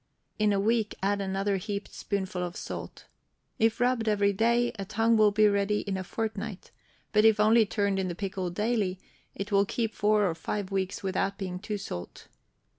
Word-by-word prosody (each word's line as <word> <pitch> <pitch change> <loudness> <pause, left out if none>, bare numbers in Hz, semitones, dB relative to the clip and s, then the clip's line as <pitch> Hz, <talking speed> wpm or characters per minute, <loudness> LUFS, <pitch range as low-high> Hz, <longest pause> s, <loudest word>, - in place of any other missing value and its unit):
In 215 -1 +3
a 200 - +2
week 220 +1 +1
add 200 +1 +1
another 195 +1 0
heaped 200 +2 -5
spoonful 190 -3 -3
of 175 -1 -4
salt. - - -7 0.5
If 225 0 +2
rubbed 245 -2 +1
every 200 -1 +3
day, 235 +3 +2
a - - -2
tongue 225 +3 +2
will 215 -1 +6
be 215 +1 +4
ready 200 0 +1
in 200 -1 -3
a 190 - -3
fortnight; 215 0 -5 0.4
but 210 0 +5
if 220 -1 +5
only 220 +1 +5
turned 200 -1 0
in 190 - -1
the 175 - -4
pickle 190 -1 -3
daily, 205 -1 -1 0.4
it 200 +2 -5
will 200 0 +5
keep 225 +2 -2
four 210 0 +3
or 170 - 0
five 190 +4 -4
weeks 195 0 -2
without 195 +1 -1
being 185 -2 -4
too 210 +1 -4
salt. 90 - -7
205 Hz, 190 wpm, -28 LUFS, 195-215 Hz, 0.5 s, will